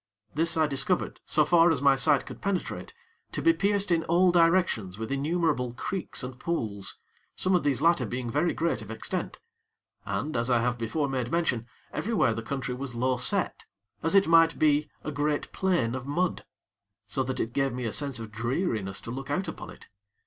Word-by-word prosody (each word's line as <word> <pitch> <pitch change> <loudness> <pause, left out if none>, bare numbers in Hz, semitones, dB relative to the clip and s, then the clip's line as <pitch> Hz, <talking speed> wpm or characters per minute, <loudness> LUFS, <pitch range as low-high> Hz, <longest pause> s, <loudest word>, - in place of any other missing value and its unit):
This 165 +2 +1
I 160 - +4
discovered, 145 +5 -1
so 150 - +3
far 170 -1 +5
as 160 -5 +2
my 140 0 +5
sight 140 +2 +3
could - - -10
penetrate, 195 -2 -3 0.4
to - - -2
be 330 - +4
pierced 200 - 0
in 165 -1 +3
all 180 +2 +4
directions 165 - +2
with 110 +2 -5
innumerable 145 -3 0
creeks 185 +6 -4
and 125 0 -7
pools, 110 - -3 0.4
some 185 - +1
of 180 - +4
these 140 -4 0
latter 165 -8 +3
being 125 +2 -4
very 150 +8 +1
great 165 +1 -1
of - - -10
extent; - - -4 0.7
and, 155 0 -3
as 115 +1 0
I 120 -2 +4
have 120 +1 0
before 140 +6 -1
made 130 -3 -2
mention, 140 -9 0 0.3
everywhere 200 - +1
the 115 - -4
country 135 +1 -3
was 125 -1 -6
low 130 +2 +1
set 125 -1 +1 0.4
as 165 +4 +1
it 195 - +6
might 165 0 +5
be 150 -1 +3
a 150 - -3
great 145 +1 -1
plain 175 -12 +1
of 130 +1 -5
mud; 175 +5 -1 0.6
so 105 +6 -2
that 130 0 -2
it 115 - -2
gave 135 0 +1
me 125 0 -4
a 115 - -2
sense 140 -4 -2
of 115 -2 -8
dreariness 110 - -2
to 115 - -7
look 135 +2 -6
out 185 +7 -1
upon - - -7
it. - - -13
140 Hz, 195 wpm, -28 LUFS, 125-170 Hz, 0.7 s, it